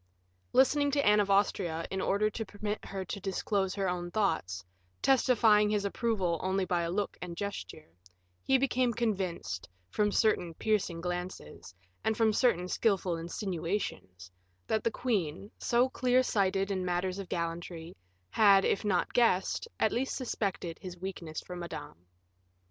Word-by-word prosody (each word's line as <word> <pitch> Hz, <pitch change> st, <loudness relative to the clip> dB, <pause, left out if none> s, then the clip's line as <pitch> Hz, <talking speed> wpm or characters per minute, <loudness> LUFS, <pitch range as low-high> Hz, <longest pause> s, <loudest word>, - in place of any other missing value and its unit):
Listening 285 Hz, +2 st, +4 dB
to 285 Hz, -1 st, +2 dB
Anne 210 Hz, 0 st, +6 dB
of 205 Hz, -1 st, +1 dB
Austria, 185 Hz, -4 st, +1 dB
in 190 Hz, 0 st, -1 dB
order 200 Hz, +3 st, +2 dB
to 225 Hz, -, -3 dB
permit 210 Hz, +1 st, -5 dB
her 190 Hz, -1 st, -5 dB
to 200 Hz, -, -5 dB
disclose 195 Hz, 0 st, -1 dB
her 195 Hz, -2 st, 0 dB
own 175 Hz, -1 st, -2 dB
thoughts, 160 Hz, -, -1 dB, 0.4 s
testifying 230 Hz, -5 st, +4 dB
his 210 Hz, -1 st, 0 dB
approval 195 Hz, -6 st, 0 dB
only 190 Hz, 0 st, 0 dB
by 170 Hz, -1 st, 0 dB
look 200 Hz, +4 st, -2 dB
and 170 Hz, -1 st, -6 dB
gesture, 200 Hz, -5 st, -5 dB, 0.5 s
he 265 Hz, -, +3 dB
became 255 Hz, -2 st, +1 dB
convinced, 185 Hz, -, -2 dB, 0.2 s
from 210 Hz, -1 st, +1 dB
certain 180 Hz, -7 st, +1 dB
piercing 195 Hz, -6 st, 0 dB
glances, 175 Hz, -, -6 dB, 0.3 s
and 220 Hz, -1 st, 0 dB
from 220 Hz, -2 st, +3 dB
certain 195 Hz, -7 st, +2 dB
skillful 190 Hz, -3 st, +1 dB
insinuations, 165 Hz, -, -4 dB, 0.3 s
that 220 Hz, -, 0 dB
the -, -, +2 dB
queen, 200 Hz, -5 st, -2 dB
so 240 Hz, +2 st, +3 dB
clear 255 Hz, 0 st, +2 dB
sighted 195 Hz, -3 st, +1 dB
in 190 Hz, -1 st, -1 dB
matters 180 Hz, +1 st, -1 dB
of 190 Hz, -2 st, -7 dB
gallantry, 170 Hz, 0 st, -4 dB, 0.4 s
had, 200 Hz, -3 st, +6 dB
if -, -, +1 dB
not 195 Hz, -4 st, 0 dB
guessed, 230 Hz, -, +2 dB
at -, -, +3 dB
least 260 Hz, +3 st, -1 dB
suspected, 195 Hz, -, -3 dB
his 180 Hz, -1 st, -8 dB
weakness 175 Hz, -4 st, -6 dB
for 180 Hz, -, -8 dB
Madame. 150 Hz, -, -8 dB
195 Hz, 150 wpm, -31 LUFS, 175-215 Hz, 0.5 s, Anne